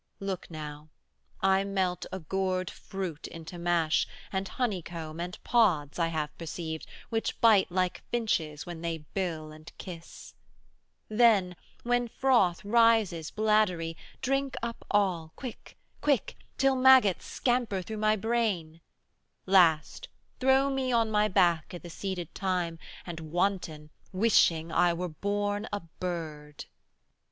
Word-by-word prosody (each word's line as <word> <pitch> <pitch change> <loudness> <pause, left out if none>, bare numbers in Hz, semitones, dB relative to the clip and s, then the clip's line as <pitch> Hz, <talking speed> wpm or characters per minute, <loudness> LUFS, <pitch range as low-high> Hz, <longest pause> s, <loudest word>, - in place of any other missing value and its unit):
Look 195 -2 -4
now, 150 -1 -8 0.5
I 190 0 +3
melt 190 -2 -1
a 190 - -3
gourd 185 +1 -1
fruit 185 -6 -6
into 165 +1 -9
mash, 170 -2 +2 0.3
Add 190 0 -1
honeycomb 170 -8 -3
and 175 +1 -4
pods, 180 - +2
I 165 - +3
have 155 -2 -3
perceived, 160 -1 -5 0.2
Which 225 -1 -2
bite 210 -5 +5
like 185 0 0
finches 165 -11 -1
when 175 -2 -7
they 165 -2 -4
bill 165 -5 -3
and 155 +2 -12
kiss 170 -3 -10 0.7
70 215 - -6
Then, 200 -7 +5 0.3
when 245 0 +1
froth 225 -8 +2
rises 220 -7 +3
bladdery, 210 -6 +1 0.3
drink 275 +1 0
up 235 -1 -4
all, 180 -6 +1
Quick, 250 -4 -9 0.2
quick, 285 -6 +1 0.2
till 270 0 +3
maggots 255 -7 +6
scamper 240 -7 0
through 220 +4 -6
my 215 0 +3
brain; 205 -8 -1 0.6
Last, 175 -5 +3 0.3
throw 265 +1 +4
me 265 -1 -1
on 230 -2 +2
my 210 0 +3
back 175 -3 +2
i' - - -4
the 175 0 -10
seeded 180 -2 -5
thyme, 180 -4 -1 0.3
And 170 -2 -6
wanton, 160 -2 -2 0.2
wishing 175 -5 +3
I 175 +1 +3
were 180 +1 -3
born 205 +5 -2
a 205 0 -2 0.2
bird. 155 -5 -5
185 Hz, 130 wpm, -29 LUFS, 165-215 Hz, 0.7 s, maggots